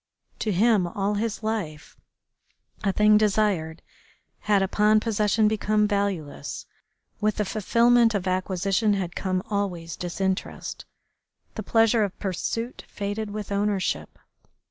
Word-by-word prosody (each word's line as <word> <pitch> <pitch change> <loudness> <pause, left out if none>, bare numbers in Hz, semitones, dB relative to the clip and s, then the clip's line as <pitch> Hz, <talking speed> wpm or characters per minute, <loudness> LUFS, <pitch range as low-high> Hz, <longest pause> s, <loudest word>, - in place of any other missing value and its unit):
To 215 - -1
him, 205 -1 +3
all 195 +3 -1
his 215 +1 -2
life, 185 -8 -4 0.9
a 200 - +2
thing 210 +1 +5
desired 200 -6 0 0.6
had 205 -2 +2
upon 210 +3 +3
possession 215 -1 +2
become 210 0 +1
valueless. 195 - -3 0.5
With 215 0 +1
the 210 - -1
fulfilment 230 +3 +3
of 195 -1 -2
acquisition 190 +3 +1
had 180 -3 -3
come 185 -1 -1
always 180 -5 -2
disinterest. 190 +2 -3 0.7
The 220 - -5
pleasure 225 +1 +3
of 200 -2 -3
pursuit 225 +5 -3
faded 205 +1 -4
with 210 -1 -6
ownership. 200 -1 -1
205 Hz, 120 wpm, -25 LUFS, 190-215 Hz, 0.9 s, thing